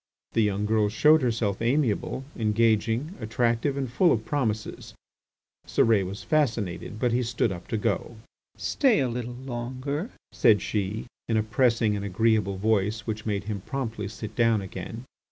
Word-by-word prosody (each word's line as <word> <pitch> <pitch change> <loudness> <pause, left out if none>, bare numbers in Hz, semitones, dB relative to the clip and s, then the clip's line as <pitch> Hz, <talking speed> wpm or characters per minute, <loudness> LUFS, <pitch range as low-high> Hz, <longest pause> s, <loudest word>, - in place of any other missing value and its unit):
The 115 - +2
young 105 -1 +1
girl 105 -1 +2
showed 150 +9 +5
herself 115 -5 0
amiable, 130 0 0
engaging, 115 - +1
attractive, 120 +4 0
and 135 -1 -1
full 165 +9 +3
of 110 -2 0
promises. 110 -7 -2 0.7
Cérès 105 -5 +3
was 100 +4 -7
fascinated, 110 - -1
but 120 +2 +1
he 120 +2 +2
stood 120 -2 0
up 90 -1 -7
to 110 - -1
go. 115 +2 -1 0.4
"Stay 265 -6 +2
a 135 - +2
little 120 0 -4
longer," 130 - -4 0.2
said 110 -3 +4
she 105 +1 -2 0.2
in 115 - +2
a 110 - +2
pressing 115 -1 +2
and 100 - -3
agreeable 100 0 +1
voice 105 +1 +1
which 110 -1 -5
made 100 -1 -1
him 100 -2 -4
promptly 115 -5 -4
sit 110 0 -8
down 115 -2 +3
again. 110 +5 -7
115 Hz, 155 wpm, -26 LUFS, 105-125 Hz, 0.7 s, showed